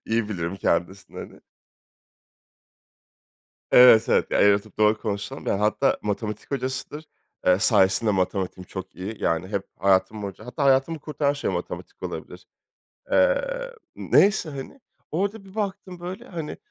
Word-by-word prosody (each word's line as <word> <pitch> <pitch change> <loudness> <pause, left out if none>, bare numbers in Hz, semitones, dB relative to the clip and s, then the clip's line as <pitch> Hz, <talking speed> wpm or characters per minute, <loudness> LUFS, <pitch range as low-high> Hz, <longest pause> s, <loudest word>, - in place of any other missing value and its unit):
İyi 115 -1 0
bilirim 90 -2 -3
kendisini, 95 +2 -2
hani. - - -10 2.3
Evet, 125 -3 +8
evet. - - +2
Ya, - - +1
eğri 100 0 +6
oturup 105 +1 -6
doğru 110 0 +4
konuşalım. 105 -2 -4
Ya, 100 - 0
hatta 110 +6 +2
matematik 105 0 -4
hocasıdır. 135 +3 -4 0.4
Eee, 90 0 +5
sayesinde 100 0 +3
matematiğim 95 -1 -1
çok 95 0 -8
iyi. 100 +5 -6
Yani, 85 +3 0
hep 100 -2 -2 0.2
hayatım 95 +2 +2
boyunca 100 +1 -7
hatta 125 +4 -3
hayatımı 135 +4 +3
kurtaran 145 -1 -1
şey 145 +1 -3
matematik - - -6
olabilir. - - -7 0.6
Eee, - - +1 0.2
neyse 200 -5 +3
hani. 140 - -8 0.3
Orada 200 +5 -2
bir 195 +1 -15
baktım, 190 -4 -4
böyle, 180 +2 -7
hani, 165 -4 -6
110 Hz, 135 wpm, -24 LUFS, 100-155 Hz, 2.3 s, Evet